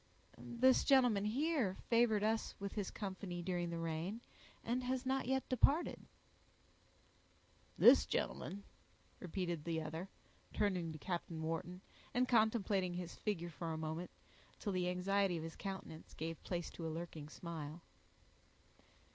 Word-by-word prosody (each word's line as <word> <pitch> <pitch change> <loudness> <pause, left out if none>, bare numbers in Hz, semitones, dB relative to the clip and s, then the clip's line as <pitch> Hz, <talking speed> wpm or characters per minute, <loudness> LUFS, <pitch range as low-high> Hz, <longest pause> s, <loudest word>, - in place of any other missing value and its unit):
"This 255 +2 +4
gentleman—here—favored 235 - +3
us 220 +1 +1
with 200 0 -3
his 205 -3 -2
company 190 -3 -5
during 175 -1 -1
the 170 - -3
rain, 165 +6 -2 0.4
and 245 +2 0
has 255 +1 -1
not 265 -1 0
yet 265 0 +1
departed." 280 +6 +2 1.7
"This - - +8
gentleman!" 200 +1 -2 0.6
repeated 175 -3 -2
the 165 0 -1
other, 160 +4 -5 0.4
turning 185 -5 +1
to 155 - -7
Captain 170 0 -3
Wharton, 165 +3 -3 0.3
and 250 +1 +3
contemplating 215 -6 +3
his 180 -1 -4
figure 175 -5 -2
for 165 +1 -4
a - - -3
moment 160 +2 -3 0.5
until 205 - -3
the 180 -1 +1
anxiety 185 0 +2
of 160 - -4
his 165 0 -6
countenance 190 -5 -7
gave 165 +1 -4
place 175 -2 -3
to 165 - -5
a - - -1
lurking 160 -2 -5
smile. 165 -1 -6
185 Hz, 130 wpm, -38 LUFS, 165-220 Hz, 1.7 s, This